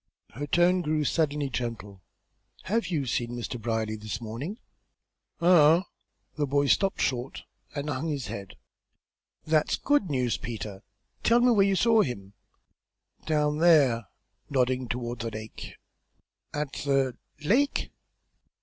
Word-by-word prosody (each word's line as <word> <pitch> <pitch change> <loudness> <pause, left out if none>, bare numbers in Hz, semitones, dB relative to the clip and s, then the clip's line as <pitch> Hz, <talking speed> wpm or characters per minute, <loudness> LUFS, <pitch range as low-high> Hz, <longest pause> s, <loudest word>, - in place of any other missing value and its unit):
Her 145 +6 -5
tone 175 +3 +3
grew 155 -2 0
suddenly 150 -2 0
gentle. 110 -6 -5 0.6
"Have 225 +4 0
you 155 -6 -1
seen 120 0 -2
Mr. 120 0 -5
Brierly 110 -1 -1
this 110 0 -5
morning?" 120 - -5 0.8
"Uh 170 -1 +6
hum!" - - -12 0.5
The 145 -1 0
boy 140 +1 +2
stopped 195 +7 +2
short 130 0 -2 0.3
and 145 0 -3
hung 150 +2 -2
his 145 -5 -2
head. 100 -1 -7 0.9
"That's 155 -1 +2
good 285 - +1
news, 125 -4 0
Peter. 105 -4 -6 0.4
Tell 235 +1 +4
me 245 0 +5
where 200 -4 +4
you 195 - +2
saw 225 +2 +4
him." 100 - -4 0.9
"Down 150 -1 +1
there," 140 - +4 0.4
nodding 130 -2 +1
toward 120 0 -4
the 115 +1 -3
lake. 110 0 -8 0.8
"At 150 -2 -3
the 135 -3 0 0.3
lake?" 280 - +2
140 Hz, 130 wpm, -27 LUFS, 120-165 Hz, 0.9 s, Uh